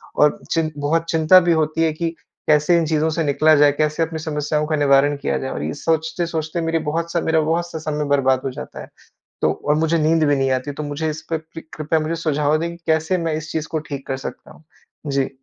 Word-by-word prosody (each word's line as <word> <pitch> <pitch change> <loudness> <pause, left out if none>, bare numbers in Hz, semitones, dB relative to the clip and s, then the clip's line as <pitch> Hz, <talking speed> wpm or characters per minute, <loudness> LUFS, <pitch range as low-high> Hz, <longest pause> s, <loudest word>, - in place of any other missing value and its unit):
और 150 0 +3
चिन 160 -1 +1
बहुत 160 +3 0
चिंता 160 +3 +6
भी 175 -1 +1
होती 160 0 +1
है 160 - +2
कि, 165 +1 -2 0.4
कैसे 150 +3 +4
इन 165 - +1
चीज़ों 155 0 +1
से 160 +1 -1
निकला 155 +2 +4
जाए। 145 0 +5
कैसे 155 +1 +1
अपनी 160 0 -4
समस्याओं 150 -1 -1
का 155 - 0
निवारण 145 0 +4
किया 140 - -1
जाए? 130 - -4
और 70 - -4
ये 80 +1 -3
सोचते-सोचते 160 0 -2
मेरी 165 0 0
बहुत 165 +2 -2
सा 170 - 0
मेरा 160 0 +2
बहुत 170 +2 -1
सा - - -5
समय 150 -1 -2
बर्बाद 130 -2 +2
हो 135 - -1
जाता - - -8
है। - - -11 0.5
तो - - +3
और 150 - +3
मुझे 160 +1 +1
नींद 160 0 +3
भी 145 -1 +3
नहीं 135 0 +1
आती, 130 +2 -1
तो 145 - -6
मुझे 150 +2 -2
इस 155 +1 -6
पे 160 - 0
पृ 160 +1 -11
कृपया 155 +1 0
मुझे 155 +2 -2
सुझाव 150 -2 +1
दें, 170 +2 -2
कि 170 - -9
कैसे 160 +3 +1
मैं 165 -2 -1
इस 155 0 -5
चीज़ 155 -1 -3
को 160 - -1
ठीक 140 -1 -5
कर 135 - -1
सकता 130 - -8
हूँ? - - -20 0.4
जी। 135 -1 0
155 Hz, 240 wpm, -21 LUFS, 145-165 Hz, 0.5 s, चिंता